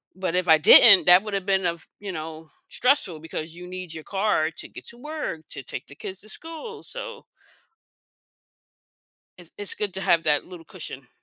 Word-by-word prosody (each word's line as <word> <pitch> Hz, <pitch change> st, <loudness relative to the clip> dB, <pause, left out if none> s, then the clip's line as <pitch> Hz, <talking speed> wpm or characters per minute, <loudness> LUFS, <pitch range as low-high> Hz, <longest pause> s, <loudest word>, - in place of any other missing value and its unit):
but 185 Hz, -2 st, -3 dB
if 180 Hz, 0 st, 0 dB
I 160 Hz, -1 st, +7 dB
didn't, 195 Hz, +6 st, +8 dB
that 180 Hz, +1 st, +8 dB
would’ve 200 Hz, -3 st, -4 dB
been, 190 Hz, -1 st, +1 dB
uh 170 Hz, -, +2 dB
f 170 Hz, -, -20 dB, 0.2 s
you 200 Hz, -2 st, -7 dB
know, 160 Hz, -1 st, -8 dB, 0.2 s
stressful 250 Hz, -, 0 dB
because 160 Hz, 0 st, -7 dB
you 180 Hz, 0 st, -10 dB
need 180 Hz, -2 st, -8 dB
your 160 Hz, -1 st, -9 dB
car 210 Hz, +2 st, +2 dB, 0.2 s
to -, -, -8 dB
get -, -, -10 dB
to 235 Hz, -, -18 dB, 0.2 s
work, 300 Hz, -, -4 dB
to -, -, -7 dB
take -, -, -6 dB
the 140 Hz, -, -14 dB
kids 190 Hz, 0 st, -7 dB
to 215 Hz, -, -17 dB
school, 330 Hz, -, -9 dB
so -, -, -8 dB, 2.1 s
It's 175 Hz, -2 st, -15 dB
it's 205 Hz, -1 st, -5 dB
good 205 Hz, -2 st, -3 dB
to 190 Hz, -, -5 dB
have 170 Hz, -3 st, +2 dB
that 150 Hz, -2 st, 0 dB
little 175 Hz, -3 st, -12 dB
cushion. 155 Hz, -, -10 dB
185 Hz, 190 wpm, -24 LUFS, 165-205 Hz, 2.1 s, didn't